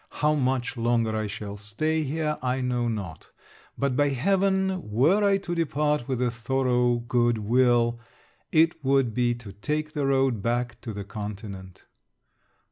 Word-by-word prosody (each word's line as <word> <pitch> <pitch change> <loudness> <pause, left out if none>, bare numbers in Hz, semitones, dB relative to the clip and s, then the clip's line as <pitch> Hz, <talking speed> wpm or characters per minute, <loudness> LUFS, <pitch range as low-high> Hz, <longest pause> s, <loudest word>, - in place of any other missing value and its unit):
How 150 0 +1
much 130 -3 0
longer 115 -1 +1
I 110 -1 -1
shall 100 0 -6
stay 155 +11 -1
here 150 +1 -2
I 125 +1 0
know 125 -2 0
not, 100 -8 -5 0.5
but 140 -2 0
by 145 +2 +3
heaven 190 - +1
were 145 - +3
I 200 -1 +4
to 180 -3 -5
depart 150 -5 0
with 130 -3 -1
a 120 - +1
thorough 125 0 +1
good 120 0 +1
will, 120 +1 +2 0.5
it 160 -1 +3
would 135 -3 +2
be 120 0 +1
to 115 -5 -11
take 150 +9 -3
the 145 -3 -1
road 135 -5 +2
back 120 +1 -2
to 115 - -6
the 100 0 -5
continent. 100 -2 -8
125 Hz, 155 wpm, -26 LUFS, 115-150 Hz, 0.5 s, I